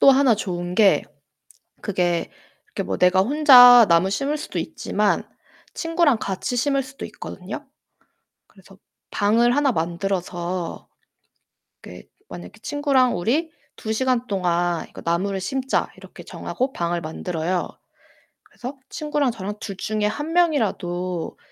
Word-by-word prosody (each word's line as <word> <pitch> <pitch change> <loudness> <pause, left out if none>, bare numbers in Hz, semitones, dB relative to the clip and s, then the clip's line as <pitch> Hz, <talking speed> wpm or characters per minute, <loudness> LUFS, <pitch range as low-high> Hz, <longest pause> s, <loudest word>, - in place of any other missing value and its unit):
또 275 - +8
하나 265 -3 +4
좋은 175 -3 -4
게 205 -1 +4 0.8
그게 175 -4 -1 0.4
이렇게 - - -5
뭐 95 +1 -3
내가 180 +1 +4
혼자 245 -1 +8
나무 170 +3 +3
심을 275 +9 -1
수도 310 - -5
있지만 - - -1 0.5
친구랑 330 -6 +1
같이 200 +5 -3
심을 275 +3 +1
수도 260 +1 -10
있거든요. - - -8 0.8
그래서 195 -1 -19 0.3
방을 230 +4 +2
하나 285 -2 +3
만들어서 175 0 -3 0.9
그 - - -11 0.3
만약에 90 0 -9
친구랑 280 -4 +1
"우리 285 - 0 0.3
2 220 - -4
시간 250 +1 0
동안 175 -4 -1
이거 - - -11
나무를 190 +4 -1
심자." 265 +7 -1
이렇게 - - -13
정하고 260 +1 -4
방을 170 -3 -2
만들어요. 170 +2 -3 0.8
그래서 255 +3 -9
친구랑 295 -4 -1
저랑 205 -2 -6
둘 195 -3 -7
중에 215 +1 -2
1 295 +10 -3
명이라도 185 - 0
210 Hz, 270 characters per minute, -22 LUFS, 180-265 Hz, 0.9 s, 또